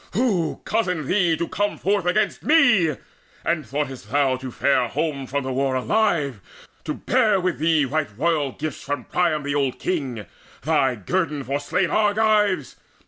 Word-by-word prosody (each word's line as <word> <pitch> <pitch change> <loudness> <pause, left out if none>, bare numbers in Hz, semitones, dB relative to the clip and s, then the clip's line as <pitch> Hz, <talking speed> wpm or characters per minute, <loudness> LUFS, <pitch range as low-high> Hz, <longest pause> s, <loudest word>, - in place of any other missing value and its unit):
Who 200 -6 0
cozened 180 -9 -1
thee 175 -1 +2
to 170 - -2
come 205 +1 -1
Forth 200 -2 0
against 215 +5 +1
me? 220 - +4 0.5
And 170 -2 0
thoughtest 135 +1 -4
thou 140 -2 +2
to 130 0 -7
fare 140 +3 +1
Home 140 -5 -2
from 140 +2 -2
the 130 0 -3
war 135 0 0
alive, 140 - 0 0.4
to 150 - -2
bear 220 -6 +2
with 185 -1 -1
thee 160 -2 +3
Right 145 +2 -1
royal 150 -2 +1
gifts 155 -3 -5
from 145 -3 -4
Priam 160 -1 0
the 145 0 -2
old 140 -3 0
king, 135 - -3 0.4
Thy 140 -5 +2
guerdon 150 - -2
for 140 +2 -2
slain 170 +5 -1
Argives? 210 - +2
155 Hz, 160 wpm, -23 LUFS, 140-185 Hz, 0.5 s, me